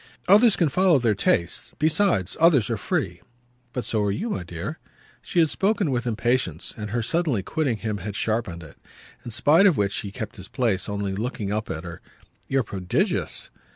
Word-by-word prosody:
"Others 210 +3 +6
can 170 - +2
follow 180 +2 +4
their 120 -4 +2
tastes. 85 -3 0
Besides, 155 - +1
others 155 -10 +4
are - - +1
free." - - -2 0.5
"But 125 - -4
so 110 - 0
are 105 - +1
you, 215 - -3
my - - -2
dear!" 85 - -6 0.4
She - - -6
had 165 -2 +6
spoken 200 -4 +1
with 125 -1 -1
impatience, 115 -7 -1
and 105 -1 -6
her 115 +2 -1
suddenly 145 - 0
quitting 140 - -1
him 105 -1 -3
had 100 +2 -6
sharpened 110 -7 -2
it; 75 - -14 0.4
in 120 - -7
spite 160 - +5
of 180 - +3
which 100 0 +1
he 100 - -3
kept 110 +2 -6
his 95 -1 -8
place, 115 -7 -1
only 100 -1 -2
looking 105 -1 -3
up 105 +1 -2
at 80 - -4
her. 85 -2 -8 0.5
"You're 135 -1 +1
prodigious!" 95 -4 -2
115 Hz, 190 wpm, -24 LUFS, 100-155 Hz, 0.5 s, Others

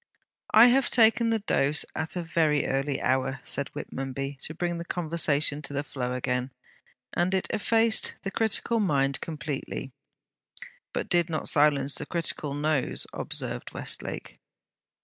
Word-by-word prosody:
'I 220 +2 +10
have 250 +1 +4
taken 230 0 +4
the 225 - +2
dose 145 -4 +2
at 160 +2 -2
a 175 - -2
very 160 -3 +1
early 135 +1 -1
hour,' 130 0 0
said 140 - -1
Whitmonby, 135 +1 -5
to 155 - -6
bring 175 0 -2
conversation 155 -4 0
to 145 - -7
the 140 +1 -1
flow 125 -3 -4
again, 125 0 -1 0.6
'and 180 +2 +1
it 190 - 0
effaced 225 +1 +2
the 195 - -3
critical 225 +2 +1
mind 140 -8 +1
completely.' 150 -3 -5 1.0
'But - - -3
did 175 -1 +2
not 160 - -1
silence 145 -2 +3
the 150 - -1
critical 155 -4 -2
nose,' 145 -2 0
observed - - -4
Westlake. - - -4
150 Hz, 140 wpm, -27 LUFS, 140-175 Hz, 1.0 s, I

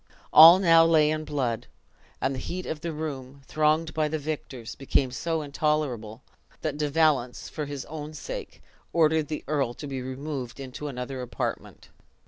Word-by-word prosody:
All 165 +3 +11
now 165 -3 +6
lay 155 -2 +4
in 155 0 -2
blood; 130 -6 -2 0.5
and 135 - 0
the 130 - -5
heat 180 +7 -5
of 155 -1 -4
the 170 - -3
room, 140 -3 -6
thronged 155 +2 +1
by 155 -1 +1
the 155 +1 -2
victors, 140 -6 -6
became 135 -1 0
so 160 +4 -2
intolerable 140 -7 -2 0.4
that - - -2
De 150 0 -1
Valence, 145 -5 +1
for 150 - -4
his 140 -2 -6
own 155 0 -7
sake, - - -7 0.3
ordered 160 -2 +3
the 155 - -4
earl 140 -5 0
to 150 - -8
be 135 -2 -4
removed 130 -1 -5
into 135 +2 -6
another 130 -1 -5
apartment. 125 - -5
150 Hz, 165 wpm, -26 LUFS, 130-155 Hz, 0.5 s, All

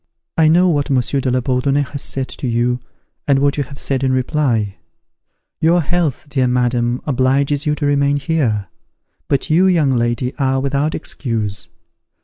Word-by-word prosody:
I 160 -1 +4
know 175 +4 +5
what 145 -5 +1
Monsieur 135 +1 +1
de 130 - 0
la 125 0 +1
Bourdonnais 135 +3 +1
has 140 - -4
said 135 -1 -2
to 130 - -5
you, 120 +1 0 0.5
and 140 -2 +4
what 140 +1 +1
you 145 - +1
have 140 +1 -12
said 135 -1 -2
in 130 - +2
reply. 130 -6 0 0.8
Your 170 +2 +3
health, 165 -3 -1
dear 135 -3 +1
madam, 125 0 0
obliges 140 +2 +1
you 150 - +2
to 150 - -3
remain 140 0 +2
here; 135 -10 0 0.6
but 140 +2 0
you, 180 +4 +5
young 160 -7 +3
lady, 120 +1 0
are 135 -1 +1
without 140 +3 0
excuse. 110 -6 -4
135 Hz, 165 wpm, -18 LUFS, 125-145 Hz, 0.8 s, know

